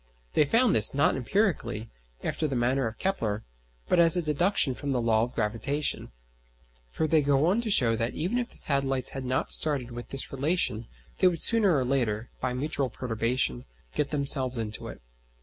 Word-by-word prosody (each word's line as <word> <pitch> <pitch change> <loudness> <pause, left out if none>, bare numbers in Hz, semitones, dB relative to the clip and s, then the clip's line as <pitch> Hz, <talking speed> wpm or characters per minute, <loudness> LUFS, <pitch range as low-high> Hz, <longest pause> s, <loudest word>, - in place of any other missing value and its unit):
They 150 - +4
found 230 - +3
this, 110 +4 +4
not 145 - +3
empirically, 135 - -1 0.3
after 155 - -1
the 135 - -3
manner 125 +1 +1
of 110 0 -7
Kepler, 110 - -2 0.4
but 180 - +2
as 170 +1 +5
a - - +1
deduction 155 -1 +2
from 140 +3 -6
the 130 -2 0
law 115 -2 +2
of 120 +2 -3
gravitation; 115 - -2 0.8
for 160 - -2
they 155 0 +3
go 140 +1 +2
on 195 +7 +2
to 230 - -4
show 120 - +3
that 115 +2 -2
even 190 +10 -1
if 245 - -3
the - - -10
satellites 135 -2 +1
had 135 -1 -6
not 130 +1 -1
started 140 -6 +1
with 120 0 -8
this 135 - -3
relation 135 - -1 0.3
they 185 - +5
would 170 -3 0
sooner 210 -8 +4
or 130 - 0
later, 120 -4 -1
by 125 - -2
mutual 135 +1 -2
perturbation, 115 - -1 0.3
get 150 - -1
themselves 135 -3 +3
into 110 -1 -5
it. - - -10
135 Hz, 185 wpm, -27 LUFS, 120-155 Hz, 0.8 s, as